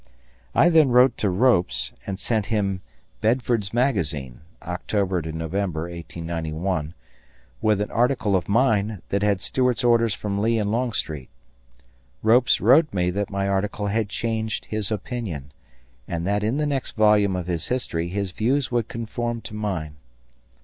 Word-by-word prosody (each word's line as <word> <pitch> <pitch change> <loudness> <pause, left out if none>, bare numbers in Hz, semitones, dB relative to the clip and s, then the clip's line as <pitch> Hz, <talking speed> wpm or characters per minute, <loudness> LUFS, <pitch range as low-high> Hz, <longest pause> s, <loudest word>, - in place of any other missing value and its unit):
I 170 - +6
then 160 -5 +5
wrote 125 0 +5
to 105 - +1
Ropes 90 - +2
and 95 -1 -3
sent 110 0 -1
him 100 -4 0 0.4
Belford's 115 -3 +1
Magazine 80 - -1 0.2
(October 90 +1 -1
November, 80 +2 -3
1891) 85 -1 -4 0.7
with 105 -2 +2
an 105 - -3
article 120 -4 +2
of 95 - -1
mine 110 -3 +2
that 100 - 0
had 100 -2 +2
Stuart's 125 +3 0
orders 115 -3 +3
from 100 -1 -3
Lee 115 +2 +2
and 105 -1 0
Longstreet. 110 - -2 0.9
Ropes 120 +3 +4
wrote 135 - +5
me 90 -2 0
that 100 +2 -2
my 100 0 -1
article 100 +1 -1
had 110 0 0
changed 110 0 -2
his 110 -1 -3
opinion, 105 - -4 0.6
and 85 0 -3
that 100 +2 +1
in 115 +6 0
the 150 - +1
next 140 -3 -2
volume 105 -3 +4
of 90 -2 -3
his 85 -2 -2
history 85 -10 -1
his 100 0 -2
views 125 +8 0
would 120 -3 0
conform 115 +1 -3
to - - -9
mine. 90 -9 -3
105 Hz, 150 wpm, -24 LUFS, 90-115 Hz, 0.9 s, I